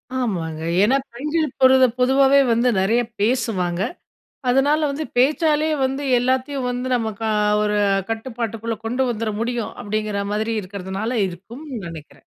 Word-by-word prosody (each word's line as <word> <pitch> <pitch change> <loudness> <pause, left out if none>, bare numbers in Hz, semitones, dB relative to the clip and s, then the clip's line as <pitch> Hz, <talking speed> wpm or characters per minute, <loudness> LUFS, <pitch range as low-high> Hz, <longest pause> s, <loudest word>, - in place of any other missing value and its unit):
ஆமாங்க. 170 -11 -2 0.2
ஏன்னா 260 +6 +4 0.2
பெண்கள் 300 +5 -1
பொரு 260 0 +7 0.2
பொதுவாவே 270 +2 +5
வந்து 235 +2 +3
நிறையா 230 +5 +2 0.2
பேசுவாங்க. 210 -7 0 0.7
அதனால 280 +5 +3
வந்து 300 +3 -3
பேச்சாலேயே 305 +3 +2
வந்து, 270 +2 -2 0.2
எல்லாத்தையும் 260 +1 -1
வந்து 250 +1 -3
நமக்கா 220 -1 -3 0.3
ஒரு 210 0 0 0.3
கட்டுப்பாட்டுக்குள்ள 225 -1 -3
கொண்டு 250 +3 0
வந்துரமுடியும் 230 +1 -2
அப்டிங்கற 210 -1 -2
மாரி 220 +2 -1
இருக்கறதுனால 200 +5 -3
இருக்கும்னு 230 - -8
நினைக்கிறேன். 160 -3 -11
235 Hz, 115 wpm, -21 LUFS, 210-265 Hz, 0.7 s, பொரு